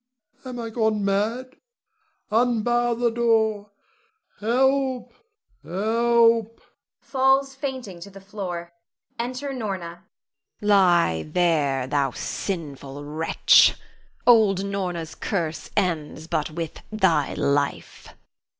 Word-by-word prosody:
am 250 Hz, -1 st, -6 dB
I 230 Hz, -1 st, -5 dB
gone 220 Hz, -3 st, 0 dB
mad? 225 Hz, +6 st, -1 dB, 0.7 s
Unbar 240 Hz, +1 st, +2 dB
the 240 Hz, 0 st, +1 dB
door! 220 Hz, -3 st, +1 dB, 0.7 s
Help! 260 Hz, +3 st, +1 dB, 0.5 s
help! 230 Hz, +3 st, +2 dB, 0.4 s
[Falls 270 Hz, 0 st, +2 dB
fainting 260 Hz, -, -6 dB
to 175 Hz, -, -10 dB
the 195 Hz, 0 st, -12 dB
floor.] 185 Hz, -4 st, -6 dB, 0.5 s
[Enter 255 Hz, +4 st, -3 dB
Norna. 230 Hz, -5 st, -4 dB, 0.2 s
Norna. 170 Hz, +2 st, -10 dB, 0.6 s
Lie 180 Hz, -, +3 dB
there, 150 Hz, -7 st, +1 dB
thou 140 Hz, 0 st, 0 dB
sinful 145 Hz, -2 st, -5 dB
wretch! 155 Hz, +3 st, +4 dB, 0.5 s
Old 210 Hz, -5 st, +5 dB
Norna's 180 Hz, -5 st, -3 dB
curse 165 Hz, -6 st, -3 dB
ends 160 Hz, -5 st, -1 dB
but 160 Hz, -2 st, -2 dB
with 165 Hz, 0 st, -6 dB
thy 190 Hz, -9 st, +1 dB
life. 140 Hz, 0 st, -1 dB
205 Hz, 95 wpm, -24 LUFS, 170-235 Hz, 0.7 s, Old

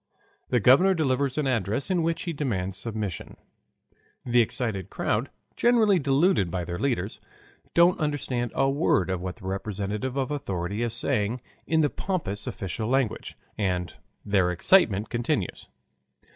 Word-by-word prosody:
The 125 Hz, -, +3 dB
governor 140 Hz, -, +5 dB
delivers 140 Hz, -3 st, 0 dB
an 150 Hz, -, +1 dB
address 115 Hz, -, 0 dB
in 180 Hz, -2 st, +2 dB
which 165 Hz, 0 st, -1 dB
he 170 Hz, -, -3 dB
demands 100 Hz, -, -2 dB
submission. 105 Hz, -3 st, -5 dB, 0.9 s
The 120 Hz, -1 st, +4 dB
excited 105 Hz, -5 st, -2 dB
crowd, 110 Hz, +6 st, -1 dB, 0.3 s
generally 220 Hz, -6 st, +4 dB
deluded 140 Hz, -, +2 dB
by 90 Hz, 0 st, -3 dB
their 85 Hz, 0 st, -5 dB
leaders, 115 Hz, -7 st, -1 dB, 0.6 s
don't 170 Hz, +1 st, +5 dB
understand 135 Hz, -6 st, -2 dB
a 135 Hz, -, +3 dB
word 135 Hz, -, +2 dB
of 90 Hz, -2 st, -2 dB
what 90 Hz, 0 st, -4 dB
the 110 Hz, -, -13 dB
representative 100 Hz, +5 st, -3 dB
of 135 Hz, +1 st, -1 dB
authority 100 Hz, -7 st, -3 dB
is 115 Hz, -1 st, -1 dB
saying 120 Hz, -2 st, -1 dB, 0.3 s
in 160 Hz, -1 st, +3 dB
the 145 Hz, -, +3 dB
pompous 150 Hz, -, -3 dB
official 110 Hz, +1 st, -4 dB
language, 130 Hz, -4 st, -1 dB, 0.2 s
and 90 Hz, -4 st, -1 dB, 0.3 s
their 100 Hz, -3 st, +2 dB
excitement 105 Hz, -, +3 dB
continues. 120 Hz, 0 st, -2 dB
120 Hz, 145 wpm, -26 LUFS, 100-145 Hz, 0.9 s, governor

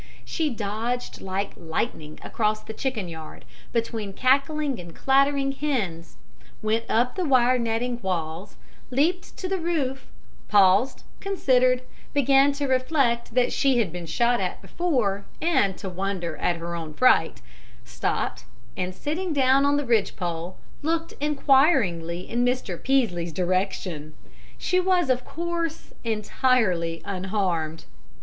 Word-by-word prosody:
She 320 Hz, -3 st, -1 dB
dodged 230 Hz, +2 st, -3 dB
like 195 Hz, +1 st, -2 dB
lightning 160 Hz, -2 st, -4 dB
across 215 Hz, -1 st, 0 dB
the 220 Hz, -, -7 dB
chicken 220 Hz, -5 st, -2 dB
yard, 160 Hz, -2 st, -9 dB, 0.3 s
between 225 Hz, -3 st, -2 dB
cackling 275 Hz, +3 st, +1 dB
and 170 Hz, -2 st, -10 dB
clattering 275 Hz, 0 st, +3 dB
hens, 225 Hz, -, -3 dB, 0.5 s
went 220 Hz, +1 st, +1 dB
up 245 Hz, +2 st, +2 dB
the 370 Hz, -, -2 dB
wire 255 Hz, -4 st, +4 dB
netting 235 Hz, +1 st, -1 dB
walls, 175 Hz, 0 st, -3 dB, 0.3 s
leaped 315 Hz, +8 st, 0 dB
to 370 Hz, -, -3 dB
the 380 Hz, 0 st, -1 dB
roof, 285 Hz, -6 st, -2 dB, 0.4 s
paused, 205 Hz, +5 st, +4 dB, 0.2 s
considered, 255 Hz, -10 st, +2 dB, 0.3 s
began 275 Hz, 0 st, +5 dB
to 285 Hz, 0 st, -2 dB
reflect 255 Hz, -3 st, +1 dB
that 250 Hz, -1 st, +3 dB
she 270 Hz, -2 st, +3 dB
had 215 Hz, -8 st, +1 dB
been 175 Hz, -1 st, -6 dB
shot 235 Hz, +9 st, +2 dB
at 180 Hz, -1 st, -2 dB
before 245 Hz, -, -1 dB
and 260 Hz, -, +2 dB
to 195 Hz, -, -6 dB
wonder 185 Hz, -2 st, -3 dB
at 175 Hz, -, +1 dB
her 170 Hz, +1 st, -5 dB
own 160 Hz, -3 st, -5 dB
fright, 255 Hz, -10 st, +4 dB, 0.5 s
stopped, -, -, -2 dB, 0.3 s
and, 185 Hz, 0 st, -3 dB
sitting 325 Hz, -, -2 dB
down 270 Hz, 0 st, +4 dB
on 285 Hz, 0 st, +3 dB
the 290 Hz, -, -1 dB
ridgepole, 180 Hz, -6 st, -1 dB, 0.2 s
looked 330 Hz, +2 st, -1 dB
inquiringly 265 Hz, -, +2 dB
in 240 Hz, +1 st, 0 dB
Mr. 245 Hz, -8 st, -1 dB
Peaslee's 215 Hz, -11 st, +1 dB
direction. 180 Hz, -3 st, -2 dB, 0.4 s
She 365 Hz, -, +1 dB
was, 360 Hz, -6 st, +2 dB
of 250 Hz, 0 st, 0 dB
course, 335 Hz, 0 st, -4 dB
entirely 210 Hz, -7 st, +1 dB
unharmed. 185 Hz, -5 st, -2 dB
235 Hz, 130 wpm, -25 LUFS, 185-275 Hz, 0.5 s, began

